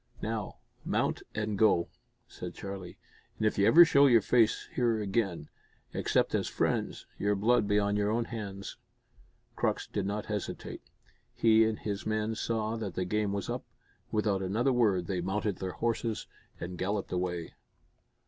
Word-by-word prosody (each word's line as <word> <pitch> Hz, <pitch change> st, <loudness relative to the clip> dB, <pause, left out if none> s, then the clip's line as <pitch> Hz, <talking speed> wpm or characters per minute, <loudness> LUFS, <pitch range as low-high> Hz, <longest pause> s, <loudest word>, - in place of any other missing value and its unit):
"Now, 110 Hz, -1 st, -3 dB, 0.3 s
mount -, -, 0 dB
and 105 Hz, -2 st, -2 dB
go," 95 Hz, -6 st, +4 dB, 0.4 s
said -, -, -8 dB
Charlie, 95 Hz, -3 st, -7 dB, 0.4 s
"and 110 Hz, -, -1 dB
if 105 Hz, -, +1 dB
you 100 Hz, -, +5 dB
ever 170 Hz, +2 st, +9 dB
show 140 Hz, -6 st, +6 dB
face 115 Hz, +1 st, +2 dB
here 120 Hz, -3 st, +1 dB
again, 95 Hz, -6 st, -1 dB, 0.5 s
except -, -, +1 dB
as -, -, +1 dB
friends, -, -, -1 dB
your 105 Hz, 0 st, +2 dB
blood 105 Hz, +2 st, +3 dB
be 105 Hz, -, +3 dB
on 100 Hz, 0 st, +2 dB
your 105 Hz, 0 st, +1 dB
own 115 Hz, +2 st, 0 dB
heads!" 100 Hz, -4 st, -6 dB, 0.8 s
Crux -, -, 0 dB
did 100 Hz, -2 st, -3 dB
not 105 Hz, +1 st, -2 dB
hesitate. 105 Hz, -2 st, -5 dB, 0.5 s
He 110 Hz, -1 st, +5 dB
and 110 Hz, -1 st, 0 dB
his 100 Hz, -1 st, -4 dB
men 110 Hz, 0 st, 0 dB
saw 110 Hz, 0 st, -2 dB
that 100 Hz, -5 st, -5 dB
the 90 Hz, -, -1 dB
game 105 Hz, +1 st, 0 dB
was 100 Hz, -1 st, -3 dB
up; -, -, -3 dB, 0.5 s
without 105 Hz, -3 st, +1 dB
another 110 Hz, +8 st, +1 dB
word 105 Hz, -7 st, +2 dB
they 90 Hz, 0 st, -2 dB
mounted 100 Hz, +1 st, -1 dB
their 95 Hz, -1 st, -4 dB
horses 115 Hz, -1 st, -1 dB, 0.3 s
and 90 Hz, +1 st, -6 dB
galloped 100 Hz, +1 st, -2 dB
away. 90 Hz, -2 st, -2 dB
105 Hz, 160 wpm, -30 LUFS, 95-110 Hz, 0.8 s, ever